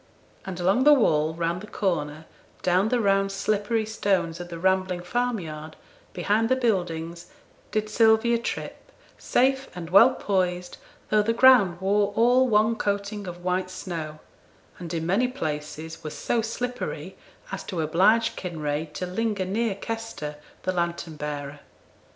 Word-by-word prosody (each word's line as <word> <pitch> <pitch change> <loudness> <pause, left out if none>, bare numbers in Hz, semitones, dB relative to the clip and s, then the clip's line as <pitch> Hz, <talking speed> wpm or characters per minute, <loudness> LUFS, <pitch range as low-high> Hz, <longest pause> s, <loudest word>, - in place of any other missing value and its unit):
"' - - -31
And 185 -2 -5
along 195 +8 +3
the 295 +1 +8
wall, 160 - +2
round 170 +1 -1
the 210 - -9
corner, 160 -7 -2 0.4
down 185 +4 +3
the 245 - +1
round 195 -2 +2
slippery 210 +3 0
stones 195 -6 0
of 175 0 -7
the 170 - -6
rambling 185 0 +1
farmyard, 175 -9 -3 0.4
behind 210 +5 +1
the 260 - +4
buildings, 175 -8 -1 0.4
did 215 0 -1
Sylvia 225 +2 +4
trip, 235 - -6 0.3
safe 265 +1 +1
and 175 -2 -7
well 230 +7 +7
poised, 180 -2 -1 0.3
though 215 0 +5
the 225 +2 +1
ground 230 -9 +6
wore 200 +2 +1
all 245 +3 +4
one 220 0 +3
coating 200 0 -2
of 175 0 -8
white 185 0 0
snow, 165 -5 -6 0.6
and 170 -3 -7
in 165 -1 -2
many 200 +9 +2
places 160 - -5
was 155 - -6
so 235 - 0
slippery 245 +2 -4 0.4
as - - -4
to 180 - -4
oblige 185 +9 +3
Kinraid 155 -3 -4
to 180 - -3
linger 200 +1 -1
near 210 +2 -1
Kester, 225 -9 -5 0.3
the 185 - 0
lantern 170 -2 -2
bearer. 145 -1 -5
190 Hz, 150 wpm, -25 LUFS, 170-220 Hz, 0.6 s, the